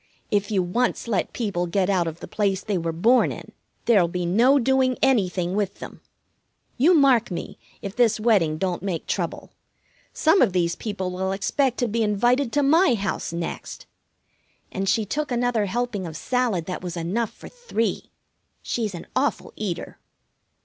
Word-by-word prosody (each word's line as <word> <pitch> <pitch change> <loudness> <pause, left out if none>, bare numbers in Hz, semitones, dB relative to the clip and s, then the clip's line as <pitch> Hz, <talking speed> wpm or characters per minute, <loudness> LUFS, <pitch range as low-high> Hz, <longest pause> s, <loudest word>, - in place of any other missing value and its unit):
If 200 -1 +1
you 195 -4 +1
once 235 +8 -1
let 205 -6 -1
people 195 -7 -2
get 185 +2 +1
out 185 -4 +1
of 165 +1 -6
the - - -7
place 195 -2 -1
they 200 -4 -1
were 165 0 -2
born 225 +10 +3
in, - - -9 0.3
there'll 205 -7 +4
be 180 +1 -3
no 235 +11 +4
doing 260 0 +2
anything 190 -8 +2
with 205 -2 -1
them. - - -10 0.7
You 320 +8 +4
mark 265 -6 +4
me, 175 - -6 0.2
if 200 +1 -5
this 235 -3 +3
wedding 200 -9 +2
don't 180 0 -2
make 185 -4 -3
trouble. - - -3 0.6
Some 325 +5 +3
of 215 -8 +3
these 170 -2 +1
people 195 -4 -4
will 190 +1 -2
expect 250 +6 0
to 245 - +2
be 230 +1 -1
invited 240 +5 +2
to 290 - +2
my 300 -1 +4
house 200 -5 -3
next." 170 0 -5 0.9
And 195 0 -2
she 215 +1 +2
took 300 +6 -3
another 240 -3 +1
helping 225 -3 -2
of 160 -1 -7
salad 235 -7 0
that 180 - -5
was 175 -1 -5
enough 195 +7 -1
for - - -13
three. 475 - -3 0.5
She's 215 -5 -2
an 170 - -8
awful 280 +2 -1
eater. 195 -6 -5
205 Hz, 170 wpm, -24 LUFS, 180-245 Hz, 0.9 s, there'll